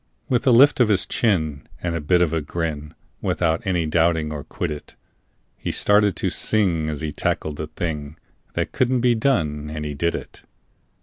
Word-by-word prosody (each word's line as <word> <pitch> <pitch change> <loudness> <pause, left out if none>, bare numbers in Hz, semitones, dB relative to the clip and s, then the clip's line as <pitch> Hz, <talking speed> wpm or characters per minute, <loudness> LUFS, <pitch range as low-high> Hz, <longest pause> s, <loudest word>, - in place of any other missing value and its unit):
With 125 +1 0
a - - +7
lift 135 +5 +6
of 125 - +5
his 95 -4 +3
chin 80 - 0
and 85 -1 -2
a 85 - -2
bit 90 +4 +3
of 80 -2 -1
a 80 - 0
grin, 75 0 -4 0.3
Without 80 -2 0
any 90 -3 +1
doubting 80 -1 +1
or 75 -1 -5
quiddit, 75 -1 -5 0.6
He - - -3
started 105 -2 +3
to - - -1
sing 85 -8 +1
as 75 -1 -4
he 80 -1 -2
tackled 75 +1 -2
the 80 - -4
thing 75 -2 -5 0.4
That - - -1
couldn't 130 -1 +1
be 125 0 +4
done, 80 - 0
and 75 0 -5
he 75 - -3
did 85 +4 0
it. - - -8
80 Hz, 185 wpm, -22 LUFS, 75-100 Hz, 0.6 s, a